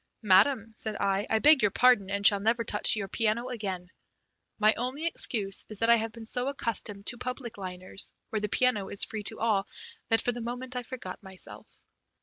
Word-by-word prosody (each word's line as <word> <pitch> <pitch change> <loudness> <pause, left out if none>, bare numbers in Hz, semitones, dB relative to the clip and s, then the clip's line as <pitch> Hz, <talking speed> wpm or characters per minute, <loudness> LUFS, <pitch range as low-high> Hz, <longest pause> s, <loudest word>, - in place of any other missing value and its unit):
"Madam," 220 +4 +4
said 215 -1 -3
I, 195 0 0
"I 220 - +2
beg 295 +4 +6
your 210 - +4
pardon, 220 -3 +3
and 200 0 -2
shall 205 -1 +7
never 230 +3 +1
touch 210 -1 +4
your 200 -2 -3
piano 225 +4 -1
again. 195 -7 -5 0.7
My 215 0 +4
only 255 +6 -3
excuse 210 -11 0
is 215 - -7
that 230 +3 +3
I 235 - +7
have 225 0 -3
been 230 0 -11
so 245 +3 -3
accustomed 220 -6 -3
to 240 - -2
public 250 -2 -5
liners, 185 0 -6 0.2
where 220 - -1
the 210 - -2
piano 225 -5 +1
is 200 - +3
free 220 - -3
to 205 - -1
all, 210 -4 +1 0.4
that 225 - +4
for 245 - 0
the 240 0 -6
moment 250 +2 -5
I 250 - -1
forgot 235 -6 -8
myself." 190 -2 -9
220 Hz, 200 wpm, -28 LUFS, 200-245 Hz, 0.7 s, shall